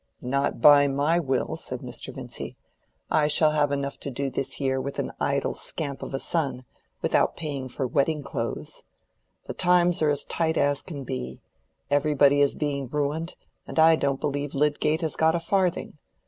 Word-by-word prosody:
"Not 140 +2 -1
by 145 +2 +7
my 145 +5 +1
will," 135 -6 -1
said - - -4
Mr. - - -5
Vincy. - - -7 0.6
"I 150 -1 +3
shall 150 +1 +4
have 145 -2 +1
enough 140 0 -3
to - - -5
do 135 +1 -3
this 130 - -1
year, 130 -1 0
with 140 +1 -5
an - - -2
idle - - 0
scamp 140 -3 -1
of - - -6
a - - 0
son, 135 -4 -2 0.4
without - - +2
paying 140 -5 -4
for 130 +2 -3
wedding 145 +4 0
clothes. 140 - -5 0.6
The - - -5
times 180 -1 +3
are 155 - +3
as 145 -1 -1
tight 160 -1 -1
as 145 0 +2
can 145 -6 -7
be; 65 - -5 0.5
everybody 145 -1 +4
is 140 - +3
being 140 -3 -2
ruined; 150 +5 -2 0.3
and - - -8
I 160 0 +7
don't 140 -3 -1
believe 145 -1 -3
Lydgate 150 +2 +1
has 160 -2 +1
got 160 +1 +3
a - - 0
farthing. 180 -3 -1
145 Hz, 175 wpm, -25 LUFS, 140-160 Hz, 0.6 s, by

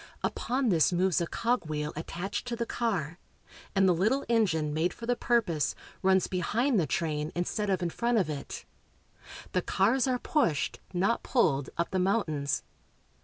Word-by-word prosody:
Upon 255 0 0
this 170 -2 +4
moves 180 0 +2
a 170 - -1
cogwheel 155 -12 -1
attached 175 +8 -4
to 240 - -2
the 235 0 -2
car, 185 -10 -2 0.6
and 195 0 +5
the 180 - +5
little 220 +11 +1
engine, 170 -10 +2
made 165 +3 0
for 230 - -8
the 245 +1 +1
purpose, 195 - +1 0.3
runs 190 0 +4
behind 225 +7 +1
the 160 - +1
train 150 -1 -1
instead 200 +4 -1
of 190 -2 +1
in 170 - -1
front 235 +4 +1
of 190 -7 +2
it. 145 -3 -6 0.9
The 180 - +1
cars 235 +10 +2
are 255 -1 +1
pushed, 245 - 0
not 190 +6 +1
pulled, 145 - +1
up 170 - -1
the 190 - 0
mountains. 160 -8 0
185 Hz, 165 wpm, -29 LUFS, 160-230 Hz, 0.9 s, and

